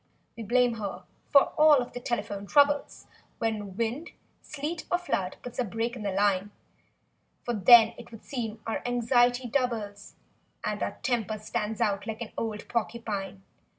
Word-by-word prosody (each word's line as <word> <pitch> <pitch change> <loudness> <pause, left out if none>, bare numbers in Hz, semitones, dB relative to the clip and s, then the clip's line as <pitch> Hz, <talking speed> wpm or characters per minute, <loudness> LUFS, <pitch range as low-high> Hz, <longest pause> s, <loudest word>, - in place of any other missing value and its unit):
We 230 - -8
blame 245 +2 +2
her 200 -3 -5 0.3
for 280 - +5
all 305 -1 +8
of 245 -3 -1
the 245 - -5
telephone 205 -4 -3
troubles, 285 +2 +2 0.3
When 210 -4 -3
wind—sleet 295 +5 -5
or 355 - +4
flood 195 - -2
puts 245 - -8
a - - +3
break 230 +2 -3
in 240 - -8
the 205 -1 -2
line; 200 0 +1 0.9
For 240 - -2
then, 225 +2 +7
it 240 - -11
would 225 -2 -12
seem, 225 -5 -5
our 225 - -2
anxiety 245 +1 +2
doubles, 225 -6 -2 0.5
And - - -2
our - - -3
temper 225 -5 0
stands 210 0 -3
out 200 +1 0
like 220 +1 -5
an 220 - -10
old 215 -2 -4
porcupine. 205 -5 -3
230 Hz, 155 wpm, -28 LUFS, 205-245 Hz, 0.9 s, all